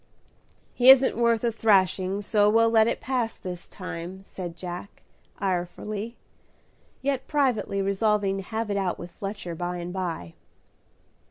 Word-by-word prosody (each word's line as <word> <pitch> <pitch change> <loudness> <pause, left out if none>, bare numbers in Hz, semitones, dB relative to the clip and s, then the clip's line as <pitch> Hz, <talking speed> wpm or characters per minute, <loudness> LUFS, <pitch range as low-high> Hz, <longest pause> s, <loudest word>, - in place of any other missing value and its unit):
"He 250 +1 +5
isn't 265 0 +8
worth 235 -1 +2
a 235 - +2
thrashing, 195 -2 +2
so 205 0 +3
we'll 230 +1 +4
let 220 -1 +5
it 235 - -1
pass 250 -3 -1
this 180 -1 -7
time," 185 0 -7
said 175 -3 -7
Jack, 180 +2 -8 0.4
irefully, 200 +4 -3 0.9
yet 275 -1 -1
privately 250 -9 +1
resolving 200 0 +1
to 195 - -5
have 220 0 -3
it 200 - 0
out 190 -3 -1
with 175 0 -9
Fletcher 195 -2 -6
by 175 +2 -3
and 175 0 -5
by. 170 - -4
200 Hz, 145 wpm, -26 LUFS, 180-225 Hz, 0.9 s, isn't